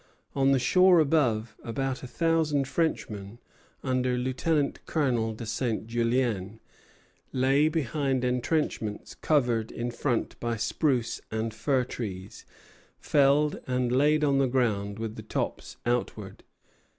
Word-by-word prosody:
On 135 Hz, 0 st, +3 dB
the 135 Hz, -, +4 dB
shore 180 Hz, +8 st, +5 dB
above, 120 Hz, -8 st, +1 dB
about 135 Hz, +2 st, -3 dB
a 130 Hz, -, -7 dB
thousand 155 Hz, -2 st, +1 dB
Frenchmen, 110 Hz, -10 st, -2 dB, 0.5 s
under 130 Hz, -1 st, 0 dB
Lieutenant 140 Hz, +4 st, 0 dB
Colonel 120 Hz, -8 st, 0 dB
de 115 Hz, -, -7 dB
Saint 110 Hz, 0 st, -2 dB
Julien, 115 Hz, -3 st, -1 dB, 0.7 s
lay 135 Hz, +3 st, +3 dB
behind 140 Hz, -4 st, -1 dB
entrenchments 125 Hz, -4 st, -1 dB
covered 120 Hz, -7 st, +1 dB
in 120 Hz, +1 st, -3 dB
front 120 Hz, 0 st, -2 dB
by 120 Hz, -1 st, -2 dB
spruce 125 Hz, +1 st, 0 dB
and 110 Hz, 0 st, -2 dB
fir 125 Hz, +4 st, +1 dB
trees, 100 Hz, -6 st, -7 dB, 0.5 s
felled 145 Hz, +1 st, +3 dB
and 125 Hz, -1 st, 0 dB
laid 150 Hz, +4 st, +3 dB
on 140 Hz, -2 st, +3 dB
the 135 Hz, -, +3 dB
ground 105 Hz, -6 st, 0 dB
with 110 Hz, -1 st, -5 dB
the -, -, -5 dB
tops -, -, -4 dB
outward. 120 Hz, 0 st, -2 dB
125 Hz, 125 wpm, -28 LUFS, 115-140 Hz, 0.7 s, shore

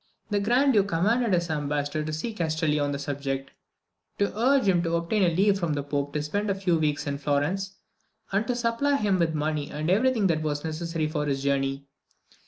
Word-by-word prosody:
The 205 Hz, -, +2 dB
Grand 250 Hz, +7 st, +3 dB
Duke 200 Hz, -3 st, +3 dB
commanded 215 Hz, +7 st, +1 dB
his 175 Hz, -2 st, +1 dB
ambassador 145 Hz, 0 st, -1 dB
to 155 Hz, -, -4 dB
see 160 Hz, +10 st, -3 dB
Castelli 160 Hz, -4 st, 0 dB
on 145 Hz, 0 st, 0 dB
the 140 Hz, -, -2 dB
subject 140 Hz, -1 st, -4 dB, 0.7 s
to 200 Hz, 0 st, 0 dB
urge 260 Hz, +4 st, +3 dB
him 180 Hz, -3 st, +4 dB
to 170 Hz, -1 st, 0 dB
obtain 170 Hz, +1 st, +1 dB
leave 195 Hz, +1 st, +3 dB
from 170 Hz, -4 st, 0 dB
the 145 Hz, -1 st, -2 dB
Pope 145 Hz, 0 st, -2 dB
to 150 Hz, -1 st, -1 dB
spend 205 Hz, +7 st, -2 dB
a 195 Hz, -, +1 dB
few 180 Hz, -4 st, +1 dB
months 150 Hz, -2 st, 0 dB
in 140 Hz, -1 st, -3 dB
Florence 155 Hz, +8 st, -1 dB, 0.6 s
and 205 Hz, +3 st, 0 dB
to 245 Hz, -, 0 dB
supply 240 Hz, +4 st, +1 dB
him 205 Hz, -8 st, +1 dB
with 165 Hz, -2 st, +1 dB
money 150 Hz, -1 st, -1 dB
and 155 Hz, +3 st, -2 dB
every 240 Hz, +7 st, +4 dB
thing 225 Hz, -6 st, 0 dB
that 165 Hz, -4 st, +2 dB
was 145 Hz, -1 st, -2 dB
necessary 160 Hz, 0 st, -2 dB
for 150 Hz, -1 st, -2 dB
his 135 Hz, -1 st, -1 dB
journey. 135 Hz, 0 st, 0 dB
165 Hz, 205 wpm, -26 LUFS, 145-200 Hz, 0.7 s, him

